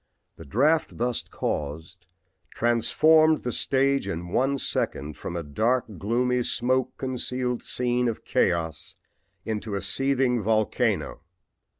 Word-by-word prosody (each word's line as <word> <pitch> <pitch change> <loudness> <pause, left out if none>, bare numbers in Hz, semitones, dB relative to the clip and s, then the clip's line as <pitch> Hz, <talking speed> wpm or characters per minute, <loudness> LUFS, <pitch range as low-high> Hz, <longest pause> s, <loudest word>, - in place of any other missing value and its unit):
The - - -11
draft 150 - +1
thus 120 0 0
caused 80 +5 -5 0.5
transformed 155 +7 +4
the 125 - -3
stage 135 -1 +2
in 85 -2 -4
one 135 +8 +1
second 75 - -2
from 85 - -6
a 85 - -3
dark, 110 - 0
gloomy, 125 +4 +1
smoke 130 +1 0
concealed 125 -1 -2
scene 125 0 0
of 115 - -4
chaos 80 -3 -1 0.5
into 110 -1 -3
a 100 - -2
seething 125 +4 +1
volcano. 110 -4 0
120 Hz, 115 wpm, -25 LUFS, 100-130 Hz, 0.5 s, transformed